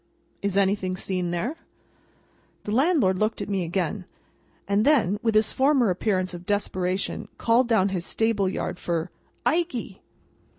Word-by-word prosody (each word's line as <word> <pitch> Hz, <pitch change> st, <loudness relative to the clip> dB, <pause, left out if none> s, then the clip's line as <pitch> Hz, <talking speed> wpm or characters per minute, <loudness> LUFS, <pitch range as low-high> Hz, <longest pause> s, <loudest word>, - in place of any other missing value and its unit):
"Is 200 Hz, -1 st, -1 dB
anything 190 Hz, -2 st, +1 dB
seen 180 Hz, -2 st, -2 dB
there?" 215 Hz, -, -2 dB, 1.1 s
The 210 Hz, -, -4 dB
landlord 255 Hz, -, +3 dB
looked 215 Hz, +1 st, 0 dB
at 200 Hz, -, -4 dB
me 195 Hz, -2 st, 0 dB
again, 180 Hz, +2 st, -2 dB, 0.6 s
and 200 Hz, +1 st, +2 dB
then, 225 Hz, -, +3 dB
with 225 Hz, -2 st, +1 dB
his 215 Hz, 0 st, +3 dB
former 265 Hz, -6 st, +3 dB
appearance 185 Hz, -1 st, -1 dB
of 175 Hz, 0 st, -8 dB
desperation, 190 Hz, -2 st, -1 dB
called 235 Hz, +2 st, +3 dB
down 220 Hz, -4 st, +3 dB
his 185 Hz, -3 st, -2 dB
stable 210 Hz, -1 st, +1 dB
yard 180 Hz, -, -4 dB
for 170 Hz, 0 st, -2 dB, 0.3 s
"Ikey!" 300 Hz, -, -1 dB
200 Hz, 140 wpm, -25 LUFS, 185-230 Hz, 1.1 s, landlord